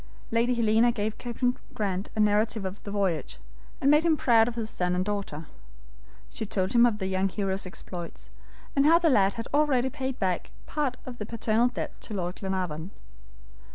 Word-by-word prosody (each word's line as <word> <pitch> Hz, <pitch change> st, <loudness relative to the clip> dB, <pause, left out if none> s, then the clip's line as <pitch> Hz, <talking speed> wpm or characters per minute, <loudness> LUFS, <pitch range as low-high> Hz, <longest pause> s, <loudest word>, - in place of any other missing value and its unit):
Lady 235 Hz, +2 st, +2 dB
Helena 230 Hz, +1 st, +4 dB
gave 215 Hz, -1 st, -3 dB
Captain 245 Hz, +1 st, -1 dB, 0.2 s
Grant 195 Hz, -2 st, -2 dB
a -, -, -3 dB
narrative 210 Hz, 0 st, +2 dB
of 190 Hz, +2 st, -5 dB
the -, -, -7 dB
voyage, 185 Hz, -, -1 dB, 0.4 s
and 280 Hz, -, +4 dB
made 300 Hz, +1 st, +6 dB
him 325 Hz, -2 st, +3 dB
proud 230 Hz, -4 st, +4 dB
of 240 Hz, -, -3 dB
his 225 Hz, -2 st, -2 dB
son 180 Hz, -4 st, -1 dB
and 180 Hz, +1 st, 0 dB
daughter. 200 Hz, -7 st, -3 dB, 0.9 s
She -, -, -5 dB
told 190 Hz, -2 st, -1 dB
him 240 Hz, 0 st, +7 dB
of 220 Hz, -3 st, -1 dB
the 190 Hz, -, -3 dB
young 190 Hz, +1 st, +1 dB
hero's 195 Hz, -1 st, -2 dB
exploits, 175 Hz, -2 st, -8 dB, 0.4 s
and 280 Hz, +1 st, +4 dB
how 330 Hz, +2 st, +7 dB
the 335 Hz, -2 st, +3 dB
lad 195 Hz, -5 st, +4 dB
had 230 Hz, -1 st, -5 dB
already 270 Hz, -4 st, +3 dB
paid 265 Hz, -2 st, -3 dB
back 185 Hz, -3 st, -1 dB, 0.2 s
part 285 Hz, -4 st, -1 dB
of 245 Hz, -2 st, -8 dB
the 210 Hz, -, -3 dB
paternal 230 Hz, +1 st, +2 dB
debt 250 Hz, -, -5 dB
to 215 Hz, -, -7 dB
Lord 180 Hz, -1 st, -3 dB
Glenarvan. 180 Hz, -4 st, -3 dB
215 Hz, 190 wpm, -27 LUFS, 190-245 Hz, 0.9 s, him